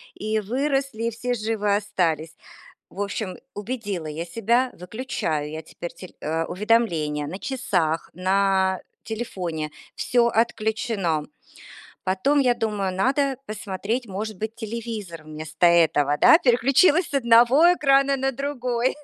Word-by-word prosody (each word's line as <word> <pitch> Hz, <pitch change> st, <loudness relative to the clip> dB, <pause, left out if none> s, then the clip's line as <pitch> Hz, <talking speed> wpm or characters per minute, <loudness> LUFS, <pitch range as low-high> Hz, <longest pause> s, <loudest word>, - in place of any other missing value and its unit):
и 215 Hz, +1 st, -1 dB
выросли, 270 Hz, +2 st, -1 dB
и -, -, +2 dB
все 245 Hz, +2 st, -2 dB
живы 215 Hz, -3 st, 0 dB
остались. 165 Hz, -6 st, -1 dB, 0.6 s
В 195 Hz, -, -9 dB
общем, 200 Hz, -1 st, -4 dB, 0.2 s
убедила 205 Hz, -6 st, -4 dB
я 155 Hz, +2 st, -4 dB
себя. 235 Hz, +7 st, +1 dB
Выключаю 175 Hz, -, -3 dB
я 155 Hz, +1 st, -5 dB
теперь 170 Hz, +2 st, -8 dB
тель 180 Hz, +1 st, -12 dB
э, 160 Hz, +2 st, -1 dB
уведомления 175 Hz, -8 st, +1 dB
на 185 Hz, +6 st, -6 dB
часах, 185 Hz, -, -1 dB
на 190 Hz, 0 st, +2 dB, 0.2 s
телефоне. 180 Hz, -9 st, -4 dB, 0.3 s
Всё 240 Hz, -1 st, +2 dB
отключено. 220 Hz, -8 st, 0 dB, 0.8 s
Потом 195 Hz, +11 st, +2 dB
я 250 Hz, -3 st, +3 dB
думаю, 210 Hz, -5 st, -2 dB
надо 270 Hz, +7 st, +1 dB
посмотреть, 215 Hz, +3 st, -3 dB
может 210 Hz, +2 st, -5 dB
быть, 220 Hz, +2 st, -4 dB
телевизор 220 Hz, -7 st, -6 dB
вместо 155 Hz, +2 st, -1 dB
этого, 155 Hz, -4 st, +4 dB
да? 325 Hz, -, +8 dB
Переключилась 275 Hz, +6 st, +4 dB
с -, -, -10 dB
одного 250 Hz, +6 st, +6 dB
экрана 275 Hz, -3 st, +3 dB
на 270 Hz, 0 st, 0 dB
другой. 255 Hz, -2 st, -1 dB
215 Hz, 125 wpm, -24 LUFS, 175-245 Hz, 0.8 s, да